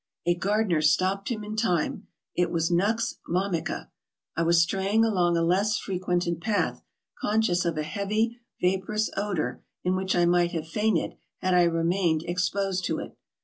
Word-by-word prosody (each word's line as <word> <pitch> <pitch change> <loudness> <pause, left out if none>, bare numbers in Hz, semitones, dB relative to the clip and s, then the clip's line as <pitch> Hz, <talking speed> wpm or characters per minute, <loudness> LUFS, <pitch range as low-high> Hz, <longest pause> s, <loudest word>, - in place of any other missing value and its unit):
A 175 - +4
gardener 195 -2 +1
stopped 185 +6 +2
him 220 -4 -3
in 210 +1 -5
time. 180 -8 0 0.3
It 175 -1 +2
was 165 0 0
nux 210 +6 +1
vomica. 180 -1 -2 0.4
I 165 - 0
was 170 0 +4
straying 195 +6 +2
along 175 -6 +2
a 165 - +2
less 195 +5 +2
frequented 175 -3 -1
path, 210 +2 0 0.4
conscious 205 -5 +1
of 170 -2 -1
a 155 - 0
heavy 215 +7 -1 0.2
vaporous 190 +4 0
odor, 190 -11 -2 0.2
in 180 +1 +1
which 190 0 0
I 175 -1 +4
might 175 0 +3
have 160 -1 -3
fainted 210 0 0 0.2
had 185 0 0
I 180 -1 +5
remained 165 -1 +1
exposed 180 +2 -1
to - - -1
it. - - -7
180 Hz, 160 wpm, -27 LUFS, 170-205 Hz, 0.4 s, I